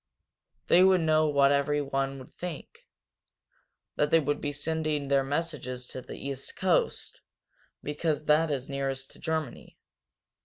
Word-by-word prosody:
They 180 - +6
would 190 -2 +5
know 155 -1 +3
what 140 -1 +4
everyone 140 -1 0
would 130 - -12
think 175 -5 -8 1.1
that 150 - +2
they 165 - +5
would 145 -1 -1
be 145 - -2
sending 155 -1 -2
their 140 -1 +3
messages 135 -4 -3
to 130 - -6
the - - -9
East 135 -1 -6
coast, 185 -2 0 0.6
because 150 +1 -2
that 155 +2 +4
is 135 -3 -2
nearest 135 -1 -3
to - - -17
Germany. 160 -2 -4
145 Hz, 140 wpm, -28 LUFS, 135-160 Hz, 1.1 s, They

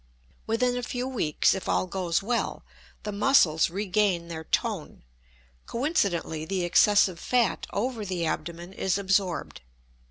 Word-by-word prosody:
Within 245 +3 +1
a - - -2
few 245 +1 -3
weeks, 215 - +1
if 190 - -5
all - - +2
goes 180 -1 -1
well, 235 +3 -2 0.4
the 210 - -3
muscles 200 - +4
regain 190 -2 0
their 160 -1 -6
"tone." - - -2 0.6
Coincidently, 200 - -1
the 185 +2 -2
excessive 185 0 +4
fat 245 -2 +1
over 230 +1 -2
the 185 -4 -2
abdomen 170 +3 -4
is 190 -1 0
absorbed. 195 -2 -1
195 Hz, 130 wpm, -27 LUFS, 170-225 Hz, 0.6 s, muscles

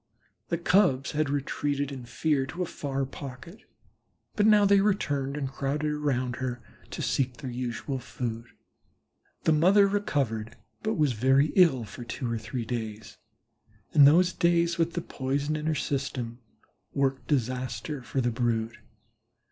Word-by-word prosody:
The 170 - 0
Cubs 170 -6 +3
had 150 -1 0
retreated 145 0 -1
in 130 -3 -7
fear 135 +3 0
to 175 +7 -3
a - - -2
far 135 -4 -3
pocket, 135 +7 -9 0.8
but 210 0 +3
now 210 -1 +6
they 200 0 +5
returned 145 -9 0
and 140 -2 -2
crowded 140 +3 -2
about 130 -5 -1
her 125 -2 -3 0.3
to - - -5
seek 130 -2 0
their 130 +1 -6
usual 125 +2 -3
food. 120 -2 -5 1.0
The 160 - +4
mother 190 +6 +5
recovered, 140 - -1 0.3
but 220 +1 -1
was 150 -6 +2
very 135 +6 +3
ill 165 -10 +5
for 110 +4 -9
two 120 0 -4
or 115 - -1
three 115 +2 -4
days, 110 -2 -5 0.7
and 145 -2 +8
those 175 +5 +5
days 170 0 +2
with 165 0 +1
the 175 - -1
poison 140 +1 -2
in 155 0 -3
her 160 - +1
system 130 -5 -3 0.6
worked 135 -1 0
disaster 130 0 -2
for 125 +3 -2
the 120 -1 +1
brood. 115 -1 -1
135 Hz, 150 wpm, -28 LUFS, 125-155 Hz, 1.0 s, and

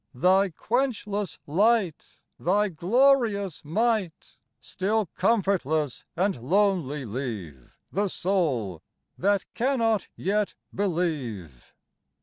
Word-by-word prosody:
Thy 190 +8 +4
quenchless 210 - -2
light, 195 +1 +1 0.2
Thy 205 +4 +2
glorious 205 - +2
might, 205 +1 -1 0.2
Still 210 +3 -1
comfortless 170 - 0
and 190 - 0
lonely 165 - +1
leave 105 - -6
The 205 +2 0
soul 150 - -1 0.3
that 200 +1 +1
cannot 230 -4 +1
yet 205 +2 -1 0.2
believe. 145 - -3
190 Hz, 85 wpm, -26 LUFS, 150-210 Hz, 0.3 s, Thy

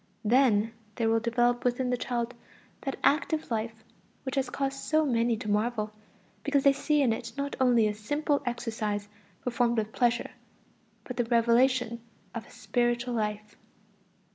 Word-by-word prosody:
Then 225 -2 +4 0.2
there 225 -2 +1
will 225 - +3
develop 240 +1 +1
within 250 +1 +1
the - - +3
child 245 -1 -2 0.5
that 270 - -3
"active 310 -1 +2
life" 220 0 -3 0.4
which 265 - -4
has 270 -1 0
caused 275 0 -2
so 310 +2 +2
many 235 -3 +2
to 215 - -7
marvel, 215 +1 0 0.5
because 285 -1 +2
they 280 - +6
see 295 +1 +2
in 235 -4 +3
it 230 0 -6
not 280 0 -2
only 245 -4 +4
a 210 - -1
simple 290 +8 0
exercise 220 -4 -2 0.4
performed 240 -1 +1
with 215 0 -1
pleasure, 240 0 +1 0.7
but 250 - -7
the 240 - +1
revelation 235 0 +3 0.3
of 230 - -6
a - - -17
spiritual 240 0 0
life. 210 -2 -3
240 Hz, 155 wpm, -29 LUFS, 225-260 Hz, 0.7 s, they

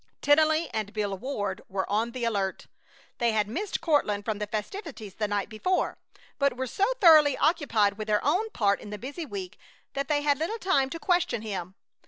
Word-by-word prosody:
Tennelly 315 +2 +4
and 215 -2 -3
Bill 205 -2 -1
Ward 205 -4 -3
were 190 0 -2
on 220 +3 0
the 240 +1 -6
alert. 200 -4 -1 0.5
They 235 -2 +2
had 210 -1 +1
missed 365 - -3
Courtland 210 -11 +1
from 215 -2 -2
the 210 - -3
festivities 220 - -5
the 210 +1 -2
night 205 -1 -1
before, 300 +12 -1 0.4
but 280 -3 +2
were 260 - -1
so 390 - 0
thoroughly 310 -6 +7
occupied 235 - +2
with 215 - -4
their 210 +1 +1
own 370 +10 +2
part 200 - +1
in - - -9
the 210 - -5
busy 285 +8 -6
week 380 0 -7 0.3
that 275 0 -2
they 290 -1 +1
had 285 -2 +2
little 345 +9 -2
time 370 -11 +2
to 330 - -6
question 350 - +1
him. 190 -4 -5
245 Hz, 195 wpm, -27 LUFS, 210-315 Hz, 0.5 s, thoroughly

